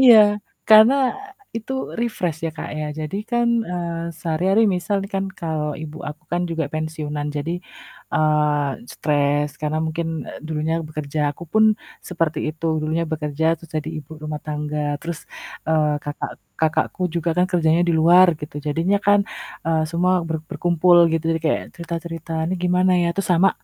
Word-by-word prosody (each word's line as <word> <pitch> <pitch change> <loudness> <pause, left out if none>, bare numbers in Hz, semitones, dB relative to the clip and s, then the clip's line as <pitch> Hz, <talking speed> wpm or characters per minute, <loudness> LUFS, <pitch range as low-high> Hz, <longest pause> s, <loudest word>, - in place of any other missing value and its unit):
Iya, 245 -3 +9 0.5
karena, 220 +4 +8 0.2
eee, 400 0 -13 0.2
itu 230 +4 -7 0.3
refresh 180 -9 -1
ya, - - -4
Kak, - - -5
ya. 155 - -2 0.2
Jadi 155 +5 -3
kan, 240 -1 +2 0.2
eee, 170 -1 -3
sehari-hari 180 +7 +2
misal 180 +3 -1
nih 195 - -9
kan, 195 - 0 0.2
kalau 155 -2 -1
Ibu 155 0 -7
aku 150 +1 -9
kan 175 - +1
juga 165 -1 -1
pensiunan 155 -2 -3
jadi, 145 +3 -2 0.6
eee, 150 -2 +2 0.2
stres, 145 0 +1
karena 155 +1 -1
mungkin, 165 +1 -2 0.2
eee, - - -8
dulunya 160 0 -1
bekerja, 150 -1 -4 0.2
aku 170 - -8
pun 220 0 +5 0.4
seperti 165 -3 -1
itu 155 +1 -7 0.2
dulunya 160 +2 0
bekerja, 150 0 -2
terus 165 0 -16
jadi 155 0 -2
ibu 150 0 -11
rumah 150 -1 -4
tangga, 150 -1 -2
terus, 170 -1 -4 0.5
eee, 155 -2 +3
kakak 145 0 -4 0.3
kakakku 160 +3 +1
juga 170 0 -1
kan 180 - +4
kerjanya 165 -1 +3
di - - +4
luar 175 +3 +7
gitu, 150 0 -7
jadinya 165 +7 +2
kan, 205 0 +6 0.5
eee, 160 -1 +2
semua 180 +2 +2
ber 160 - 0
berkumpul 175 0 +3 0.2
gitu, 165 0 0
jadi 165 0 0
kayak 155 - +1
cerita-cerita, 165 -1 -6 0.2
"Nih 185 - 0
gimana 180 +1 +3
ya?" 170 - +2
Terus 195 - -2
sama 190 +3 +5
165 Hz, 165 wpm, -22 LUFS, 150-180 Hz, 0.6 s, Iya